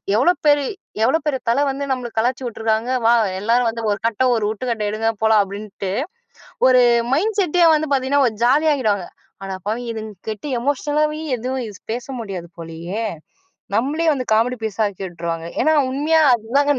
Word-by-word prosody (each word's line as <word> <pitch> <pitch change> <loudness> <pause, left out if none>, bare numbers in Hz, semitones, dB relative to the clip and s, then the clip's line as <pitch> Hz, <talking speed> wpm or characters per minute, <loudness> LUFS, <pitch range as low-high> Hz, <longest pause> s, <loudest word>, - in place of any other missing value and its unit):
"எவ்வளோ 260 +11 +4
பெரி 290 -1 +4 0.4
எவ்வளோ 265 +8 +3
பெரிய 275 -4 0
தலை 245 +5 +3
வந்து 275 +1 -3
நம்மள 250 -2 -2
கலாய்ச்சி 250 +3 0
விட்ருக்காங்க. 225 0 -1 0.2
வா! 235 - +6 0.3
எல்லாரும் 235 +3 +2
வந்து 230 0 -5
ஒரு 205 - 0
கட்டை 230 +3 +1
ஒரு 225 -2 0
உருட்டுக்கட்டை 220 -1 -2
எடுங்க. 220 +2 0
போலாம்!" 220 -1 +5
அப்படின்ட்டு, 200 -1 -6 0.8
ஒரு 255 -1 +6 0.3
மைண்ட் 415 +9 +1
செட்டே 355 -2 +3
வந்து 310 0 0
பாத்தீங்கன்னா, 270 +2 +2
ஒரு 225 - -2
ஜாலியாக்கிடுவாங்க. 255 - +2 0.4
"அட 195 -1 -4
பாவி! 225 +3 -1
இதுங்க 220 -1 -6 0.2
கிட்ட 215 +6 -6 0.2
எமோஷனலாவே 300 +3 0 0.2
எதுவும் 255 +1 -3 0.3
பேச 245 +1 -5
முடியாது 190 -6 -6
போலயே" 170 +6 -5 0.8
நம்மளயே 300 +8 0
வந்து 255 -3 -4
காமெடி 240 +3 +1
பீஸ் 220 0 -4
ஆக்கி 200 -1 -6
விட்டுருவாங்க. 170 -1 -5 0.2
ஏன்னா 315 - +3 0.2
உண்மையா 310 +4 +2
அதுதாங்க 275 +6 +1
240 Hz, 155 wpm, -20 LUFS, 215-285 Hz, 0.8 s, வா